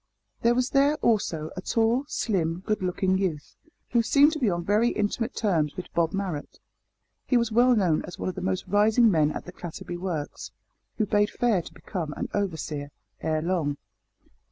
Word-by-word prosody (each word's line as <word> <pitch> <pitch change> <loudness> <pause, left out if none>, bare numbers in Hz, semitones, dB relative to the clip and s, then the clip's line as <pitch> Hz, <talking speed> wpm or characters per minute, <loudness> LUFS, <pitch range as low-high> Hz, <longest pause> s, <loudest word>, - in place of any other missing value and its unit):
There 235 +1 +3
was 255 0 0
there, 280 +2 +4
also, 165 -9 +1
a 185 - -5
tall, 230 +6 +1
slim, 175 - -1
good 215 -2 0
looking 185 +1 +1
youth, 165 -7 -3 0.4
who 235 - +4
seemed 285 +6 +5
to 310 - -3
be 240 -7 +2
on 175 -1 -1
very 215 +5 +3
intimate 220 +3 -2
terms 165 -9 0
with 185 - -7
Bob 165 -1 +1
Marrot. 185 -7 -4 0.7
He 250 - +4
was 235 -1 +1
well 245 +2 +5
known 180 -7 +2
as 180 - -9
one - - -4
of 185 - -1
the 190 - -6
most 185 0 -1
rising 215 +4 +4
men 155 -4 +3
at - - -6
the 180 - -8
Clatterby 175 0 -7
works, 170 -5 -4 0.5
who 215 - +2
bade 205 0 +2
fair 230 -7 +1
to - - -11
become 165 -7 -5
an - - -3
overseer 160 -7 -3 0.3
ere 155 -1 0
long. 165 -5 0
190 Hz, 185 wpm, -26 LUFS, 170-225 Hz, 0.7 s, seemed